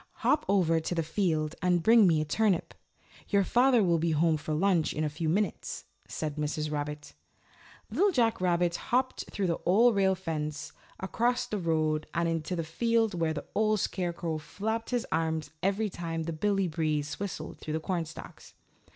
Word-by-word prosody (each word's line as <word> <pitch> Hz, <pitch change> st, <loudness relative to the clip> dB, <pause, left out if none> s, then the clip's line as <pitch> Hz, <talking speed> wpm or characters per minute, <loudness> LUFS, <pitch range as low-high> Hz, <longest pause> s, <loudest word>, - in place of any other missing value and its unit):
"Hop 300 Hz, -, +3 dB
over 170 Hz, -5 st, +3 dB
to 160 Hz, +2 st, -3 dB
the 165 Hz, -, 0 dB
field 155 Hz, -3 st, 0 dB
and 180 Hz, -2 st, +2 dB
bring 225 Hz, -1 st, +6 dB
me 160 Hz, -3 st, +3 dB
a -, -, -2 dB
turnip. 195 Hz, +2 st, +1 dB, 0.6 s
Your 200 Hz, -1 st, +3 dB
father 245 Hz, +2 st, +4 dB
will 170 Hz, -3 st, +2 dB
be 165 Hz, 0 st, +1 dB
home 160 Hz, +1 st, +3 dB
for 155 Hz, 0 st, -3 dB
lunch 175 Hz, -1 st, +2 dB
in 155 Hz, -, -2 dB
a 150 Hz, -, 0 dB
few 155 Hz, +2 st, -3 dB
minutes," 195 Hz, +2 st, -2 dB, 0.2 s
said 155 Hz, -1 st, -4 dB
Mrs. 150 Hz, 0 st, -2 dB
Rabbit. 150 Hz, 0 st, -4 dB, 0.8 s
Little 405 Hz, +2 st, +3 dB
Jack 235 Hz, -, +1 dB
Rabbit 175 Hz, -1 st, +2 dB
hopped 255 Hz, 0 st, -1 dB
through 200 Hz, -, -2 dB
the 170 Hz, -2 st, 0 dB
Old 225 Hz, +7 st, +5 dB
Rail 190 Hz, -1 st, +3 dB
Fence, 155 Hz, -4 st, -4 dB, 0.3 s
across 240 Hz, +6 st, 0 dB
the 210 Hz, -, -3 dB
road 155 Hz, -2 st, 0 dB
and 170 Hz, 0 st, +1 dB
into 165 Hz, +1 st, -2 dB
the 165 Hz, -, -2 dB
field 225 Hz, +6 st, +1 dB
where 165 Hz, -2 st, 0 dB
the -, -, -5 dB
Old 215 Hz, 0 st, +2 dB
Scarecrow 170 Hz, -4 st, -2 dB
flapped 220 Hz, +9 st, -4 dB
his 245 Hz, -2 st, -1 dB
arms 160 Hz, -1 st, -1 dB
every 200 Hz, +3 st, 0 dB
time 165 Hz, -2 st, -4 dB
Billy 190 Hz, +4 st, 0 dB
Breeze 155 Hz, -3 st, -2 dB
whistled 185 Hz, -6 st, -5 dB
through 155 Hz, -, -5 dB
the 160 Hz, -, 0 dB
cornstalks. 165 Hz, -2 st, -6 dB
170 Hz, 175 wpm, -29 LUFS, 155-205 Hz, 0.8 s, bring